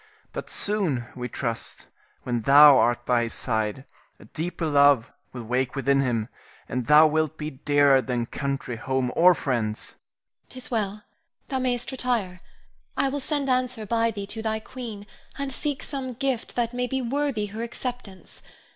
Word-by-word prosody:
But - - -6
soon 185 - 0
we 125 -1 -5
trust, 115 -3 -4 0.4
when 120 -2 -1
thou 140 +2 +8
art 120 0 +1
by 120 -1 +3
his 115 -1 -2
side, 110 +2 -1 0.3
a - - -14
deeper 165 +1 -4
love 140 -5 +4 0.2
will 125 -2 -7
wake 125 +3 -1
within 135 0 +2
him, 115 -5 0 0.4
and 125 -2 -3
thou 150 +1 +8
wilt 155 0 +1
be 155 0 -4
dearer 140 0 +3
than 125 -2 -2
country, 135 -2 -4
home, 130 +1 -1
or 180 +1 +6
friends. 115 -7 -2
Irene. - - -31
'Tis 255 0 -10
well; 210 -2 -2 0.5
thou 265 -2 -1
mayst 245 -1 -1
retire. 230 -9 -2 0.6
I 275 - +2
will 285 +2 -2
send 285 0 -2
answer 255 -3 0
by 230 +2 +1
thee 205 -3 -5
to 220 +2 -5
thy 220 0 -1
queen, 220 -3 -8 0.3
and 280 -1 -3
seek 290 +1 -3
some 265 -3 -5
gift 265 -1 -2
that 235 -1 0
may 250 0 -1
be 265 +1 -2
worthy 270 -3 -1
her 220 - -4
acceptance. 235 -4 -7
175 Hz, 165 wpm, -25 LUFS, -, 0.6 s, thou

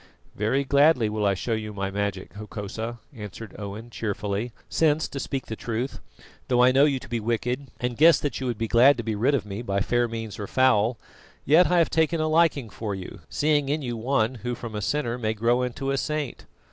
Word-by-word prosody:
"Very 110 +7 0
gladly 140 -4 +4
will 105 -1 0
I 100 - +2
show 115 +5 -2
you 110 -1 -3
my 100 0 -2
magic, 100 -3 -3
Hokosa," 110 +2 -6 0.2
answered 105 0 -8
Owen 105 +3 -7
cheerfully, 105 +1 -3 0.2
"since, 155 -1 +2
to 140 - -6
speak 135 -1 -3
truth, 115 +2 -4 0.5
though 125 -1 +4
I 125 - +6
know 135 +2 +5
you 140 -3 +1
to 130 - -10
be 120 -1 -2
wicked, 120 +4 -2
and 125 -1 -2
guess 165 +2 +7
that 145 -5 -2
you 130 - -3
would 120 -3 -2
be 115 - -2
glad 125 +5 +6
to 120 - -3
be 110 0 -2
rid 125 +7 +2
of 120 - -2
me 100 +2 -5
by 100 -4 -1
fair 120 +4 +1
means 115 -2 -6
or 100 - -4
foul; 120 -2 +3 0.5
yet 160 +6 +6
I 180 - +3
have 170 - +3
taken 160 +1 +2
a 155 - +1
liking 155 -7 +2
for 105 -1 -4
you, 95 -1 -8
seeing 145 -2 +1
in 150 +1 -1
you 120 -2 -3
one 120 0 +1
who 120 0 -2
from 115 -2 -7
a 105 - -3
sinner 125 0 -1
may 110 -1 -1
grow 120 +3 +2
into 135 +2 -2
a 135 - 0
saint. 150 -3 -3
120 Hz, 220 wpm, -25 LUFS, 110-140 Hz, 0.5 s, guess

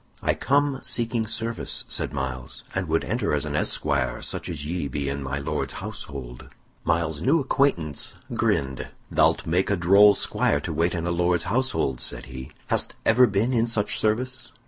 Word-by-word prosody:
"I - - +3
come 140 0 +1
seeking 115 -1 0
service," 115 +2 -1
said - - 0
Myles, 65 -1 -5
"and 95 -1 -2
would 80 +1 +1
enter - - 0
as - - -1
an - - -3
esquire - - 0
such - - -5
as 70 - -5
ye 85 -1 -2
be 70 0 -3
in 70 +1 -2
my 70 0 -3
Lord's 75 +2 -3
household." 65 -4 -7 0.4
Myles's 80 -3 0
new 150 - +3
acquaintance 130 - 0 0.2
grinned. 65 -2 0 0.2
"Thou'lt - - +3
make 90 +4 +1
a 100 - +3
droll 100 +4 +6
squire 70 - +1
to 80 - -4
wait 85 +3 +1
in 85 -1 -2
a 85 - 0
Lord's 85 0 +1
household," 120 - 0
said - - -3
he. 65 +1 -8 0.2
"Hast - - 0
ever 125 +3 +6
been 105 +5 +1
in 115 -1 +2
such 110 -3 -1
service?" 120 +3 -1
90 Hz, 175 wpm, -25 LUFS, 70-115 Hz, 0.4 s, droll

